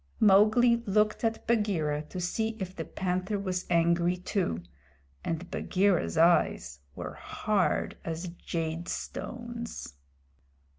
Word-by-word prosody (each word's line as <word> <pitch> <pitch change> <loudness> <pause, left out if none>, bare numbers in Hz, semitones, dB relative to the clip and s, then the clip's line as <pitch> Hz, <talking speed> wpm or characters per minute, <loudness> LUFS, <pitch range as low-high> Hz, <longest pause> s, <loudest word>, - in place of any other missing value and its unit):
Mowgli 215 +4 +6
looked 210 +3 +2
at 225 -1 -1
Bagheera 190 -10 +1
to 185 - -5
see 220 +5 -1
if 190 -1 -5
the - - -4
Panther 185 +2 -2
was 185 -2 -3
angry 170 +1 +3
too, 180 - -2 0.6
and 170 +2 -3
Bagheera's 190 -3 +1
eyes 165 - +3 0.2
were - - -6
as - - -14
hard 210 -3 0
as 165 +2 -4
jade 165 -1 -4
stones. 235 - -5
185 Hz, 115 wpm, -29 LUFS, 170-215 Hz, 0.6 s, Mowgli